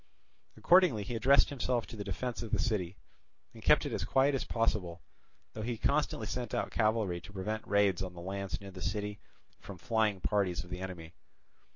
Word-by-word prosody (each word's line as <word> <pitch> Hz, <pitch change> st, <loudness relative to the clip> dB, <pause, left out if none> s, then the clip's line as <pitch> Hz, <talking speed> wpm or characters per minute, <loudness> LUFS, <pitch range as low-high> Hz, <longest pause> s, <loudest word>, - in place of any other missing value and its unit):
Accordingly 175 Hz, -, +5 dB
he 110 Hz, -, -5 dB
addressed 130 Hz, +5 st, +5 dB
himself 125 Hz, -3 st, -1 dB
to 120 Hz, -, -10 dB
the 105 Hz, -, -5 dB
defence 125 Hz, +3 st, -3 dB
of 115 Hz, -, -6 dB
the -, -, +1 dB
city, 100 Hz, -5 st, -1 dB, 0.6 s
and -, -, -12 dB
kept -, -, +4 dB
it -, -, -3 dB
as -, -, -1 dB
quiet 135 Hz, +2 st, +3 dB
as 135 Hz, -, 0 dB
possible, 105 Hz, -7 st, -1 dB, 0.5 s
though 110 Hz, -, -6 dB
he 115 Hz, +1 st, -2 dB
constantly -, -, 0 dB
sent -, -, -3 dB
out -, -, -1 dB
cavalry 110 Hz, -5 st, +1 dB
to 100 Hz, -, -12 dB
prevent 105 Hz, +3 st, -4 dB
raids 100 Hz, -3 st, +3 dB
on 90 Hz, -2 st, -5 dB
the -, -, -8 dB
lands 95 Hz, +1 st, -4 dB
near 100 Hz, -1 st, -10 dB
the 90 Hz, -1 st, -10 dB
city 105 Hz, 0 st, -3 dB, 0.4 s
from 100 Hz, -, -9 dB
flying 110 Hz, -4 st, +1 dB
parties 95 Hz, -2 st, 0 dB
of 90 Hz, -, -15 dB
the 90 Hz, -, -4 dB
enemy. 90 Hz, -3 st, -7 dB
105 Hz, 195 wpm, -32 LUFS, 95-115 Hz, 0.6 s, Accordingly